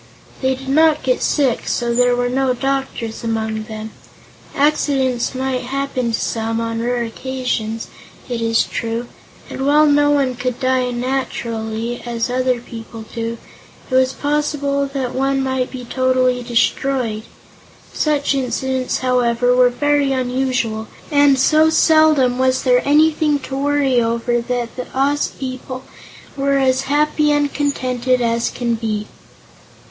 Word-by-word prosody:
They 260 0 +1
did 265 +1 -9
not 310 +1 +4
get 255 -1 +1
sick, 270 -5 +1
so 240 -1 0
there 245 0 +3
were 245 0 0
no 260 0 +1
doctors 270 -4 -3
among 220 -1 -2
them. 215 0 -7 0.6
Accidents 270 -4 +1
might 260 -1 -1
happen 265 -2 -2
to 225 - -1
some, 225 0 -2
on 230 0 -2
rare 240 0 0
occasions, 230 -2 -3 0.4
it 240 -3 -3
is 230 0 +2
true, 230 +1 -3 0.4
and 265 - -5
while 295 +2 +5
no 290 0 +4
one 280 -3 +2
could 250 0 -3
die 255 -1 +1
naturally, 240 -2 -3
as 235 0 -2
other 255 -1 +1
people 225 -1 -9
do, 230 0 -3 0.5
it - - -4
was 260 0 +3
possible 285 -1 -1
that 270 -3 -3
one 270 +1 0
might 260 -1 -1
be 250 -2 -8
totally 255 0 +1
destroyed. 240 -1 0 0.7
Such 295 -2 +1
incidents, 260 0 -1
however, 245 -1 +2
were 250 0 +5
very 290 +2 +1
unusual, 250 -4 -1 0.2
and 285 -2 +5
so 310 +4 +4
seldom 310 -6 +4
was 260 0 +2
there 250 -1 +4
anything 300 0 +3
to 270 - -6
worry 275 -2 +2
over 235 +1 0
that 240 -1 -3
the 250 - -5
Oz 285 +2 +1
people 255 0 -7 0.5
were 275 0 +1
as 265 0 +2
happy 300 +1 +2
and 290 -1 +1
contented 255 -3 0
as 235 -1 0
can 240 -1 -2
be. 220 -2 -2
255 Hz, 140 wpm, -19 LUFS, 235-275 Hz, 0.7 s, while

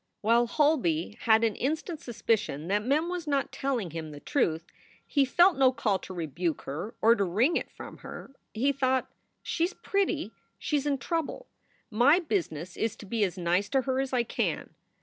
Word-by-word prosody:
While 235 +3 +3
Holby 230 - +1
had 220 -1 +5
an 225 -2 +2
instant 315 +4 -2
suspicion 215 - -1
that 205 +1 +1
Mem 290 +7 +1
was 350 -2 -4
not 280 -2 0
telling 250 - -2
him 160 -1 -5
the 145 -1 -9
truth, 165 - 0 0.4
he 280 -2 +2
felt 350 +7 +4
no 260 -1 +6
call 210 -6 0
to - - -10
rebuke 165 0 -2
her 160 +11 -5
or 225 +1 +7
to 210 -4 +1
wring 220 - +2
it - - -1
from - - -11
her. - - -9 0.2
He 260 +6 +1
thought: 260 -1 0 0.3
"She 335 - 0
s 360 - -5
pretty. 400 0 0 0.3
She 300 - 0
s 290 +1 -2
in 280 -1 +1
trouble. 330 - -3 0.5
My 245 +9 +5
business 240 - -2
is 225 -1 -1
to - - -11
be 220 +2 0
as 190 -1 -1
nice 180 +3 +1
to 270 - +2
her 260 0 0
as 270 -1 -1
I 250 -2 +2
can." 230 - -2
240 Hz, 190 wpm, -28 LUFS, 190-285 Hz, 0.5 s, or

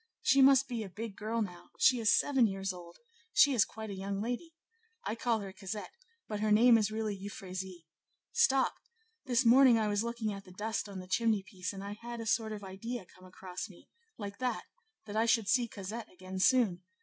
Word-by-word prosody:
she 275 +1 +5
must 275 0 +6
be 240 -3 -3
a 205 - -6
big 215 +2 -6
girl 220 +2 -1
now; 180 -3 -9
she 255 -2 +5
is 220 -2 +3
seven 265 -5 +4
years 195 -1 -3
old; 175 -1 -12 0.4
she 285 - +6
is 235 - +5
quite 220 -1 -7
a - - -5
young 195 +1 -3
lady; 245 +10 -4 0.5
I - - -1
call 230 -1 0
her 195 -1 -7
Cosette, 200 +2 -6 0.4
but 210 -1 -4
her 215 0 +1
name 235 +3 +7
is 215 -2 +3
really 215 -1 -2
Euphrasie. 190 -3 -7 0.5
Stop! 265 0 +3 0.5
this 250 0 +2
morning 250 0 +7
I 215 -1 +1
was 205 +1 +1
looking 235 -2 -2
at 195 0 -8
the 185 - -15
dust 215 +2 -3
on 200 - -7
the 185 0 -8
chimney 220 0 +1
piece, 185 -2 -5
and 195 -1 -8
I 200 +1 -5
had 235 0 -6
a 230 - -5
sort 220 0 +1
of 210 -1 -6
idea 195 +3 -6
come 185 +1 -18
across 185 +2 -7
me, 180 - -17 0.3
like 200 -1 -7
that, 255 -1 -1 0.4
that 210 -1 -7
I 225 +1 +2
should 225 -2 +3
see 245 +1 +3
Cosette 215 +2 -7
again 185 +1 -7
soon. 205 -5 +3
215 Hz, 210 wpm, -32 LUFS, 195-235 Hz, 0.5 s, name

